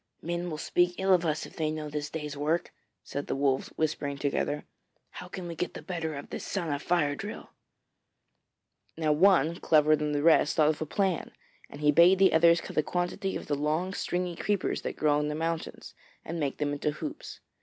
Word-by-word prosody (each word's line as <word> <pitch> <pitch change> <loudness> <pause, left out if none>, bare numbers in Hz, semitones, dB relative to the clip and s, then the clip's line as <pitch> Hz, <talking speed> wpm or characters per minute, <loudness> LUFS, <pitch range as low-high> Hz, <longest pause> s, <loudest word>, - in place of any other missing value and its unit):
'Men 175 +1 -3
will 155 - -4
speak 175 +3 +1
ill 190 0 +4
of 175 -2 +3
us 155 0 -1
if - - -13
they 155 -2 0
know 155 0 -4
of 150 - -7
this 145 0 -3
day's 150 -2 -5
work,' 155 +4 -1 0.3
said 140 - -5
the - - -1
Wolves, 135 -1 +1
whispering 150 -2 -1
together. 145 +1 -1 0.5
'How 180 - -9
can 180 -1 -7
we 170 - -5
get 175 +2 -4
the - - -8
better 165 -4 -3
of 140 - -8
this - - -5
son 170 -6 -2
of 145 - -3
Fire 170 -5 +1
drill?' 205 +8 -7 1.5
Now 155 -2 +1
one, 170 -1 +4
cleverer 155 -1 +4
than 150 0 -2
the 145 0 0
rest, 160 -2 +5
thought 155 -2 +4
of 155 - -2
a 155 - -2
plan, 190 -1 -1 0.4
and 145 - -10
he 150 0 +5
bade 170 +5 +6
the 190 0 +5
others 170 +1 +5
cut - - -9
a - - +6
quantity 180 +4 -2
of - - -5
the 145 - -2
long 155 +6 -1
stringy 180 -2 -2
creepers 205 +2 -1
that - - -5
grow 150 -1 +3
on 150 - -1
the 150 - -2
mountains, 165 +1 -4 0.3
and 165 +1 -4
make 140 -3 -2
them 145 -1 -1
into 145 +1 -1
hoops. 300 - -6
155 Hz, 215 wpm, -29 LUFS, 150-175 Hz, 1.5 s, bade